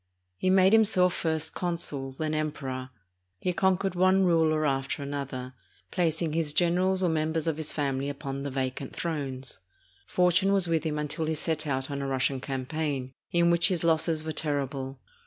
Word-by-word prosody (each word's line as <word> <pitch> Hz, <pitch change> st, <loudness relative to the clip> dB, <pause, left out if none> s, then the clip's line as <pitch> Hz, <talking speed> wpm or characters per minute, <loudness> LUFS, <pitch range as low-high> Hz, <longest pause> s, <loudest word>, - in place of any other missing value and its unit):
He 185 Hz, -, +1 dB
made 190 Hz, +1 st, +5 dB
himself 195 Hz, -5 st, +4 dB
first 160 Hz, -1 st, 0 dB
consul, 150 Hz, -6 st, -3 dB
then 155 Hz, +3 st, -2 dB
Emperor. 135 Hz, -4 st, -3 dB, 0.5 s
He 180 Hz, -, -1 dB
con 190 Hz, +1 st, +3 dB
quered 195 Hz, 0 st, -2 dB
one 185 Hz, +2 st, +4 dB
ruler 160 Hz, -3 st, +3 dB
after 135 Hz, +1 st, -1 dB
another, 135 Hz, -2 st, -5 dB, 0.4 s
placing 165 Hz, -2 st, 0 dB
his 160 Hz, -2 st, 0 dB
generals 185 Hz, +3 st, +2 dB
or 180 Hz, -, +3 dB
mem 160 Hz, 0 st, 0 dB
bers 160 Hz, -2 st, -1 dB
of 160 Hz, -2 st, 0 dB
his 155 Hz, -1 st, -2 dB
family 140 Hz, -1 st, -1 dB
upon 140 Hz, -1 st, -5 dB
the 140 Hz, -, -3 dB
vacant 130 Hz, 0 st, -3 dB
thrones. 135 Hz, -, -4 dB, 0.5 s
Fortune 180 Hz, +2 st, +3 dB
was 195 Hz, -3 st, +5 dB
with 165 Hz, -1 st, 0 dB
him 150 Hz, -1 st, -1 dB
until 150 Hz, +1 st, -1 dB
he 160 Hz, -, 0 dB
set 155 Hz, 0 st, -1 dB
out 135 Hz, 0 st, -2 dB
on 140 Hz, 0 st, -3 dB
a 140 Hz, -, -2 dB
Russian 135 Hz, 0 st, 0 dB
campaign, 135 Hz, 0 st, -3 dB, 0.2 s
in 170 Hz, 0 st, +4 dB
which 170 Hz, 0 st, +4 dB
his 180 Hz, -4 st, -1 dB
losses 160 Hz, -1 st, +2 dB
were 160 Hz, -, -3 dB
terrible. 140 Hz, -3 st, -2 dB
155 Hz, 175 wpm, -28 LUFS, 140-170 Hz, 0.5 s, made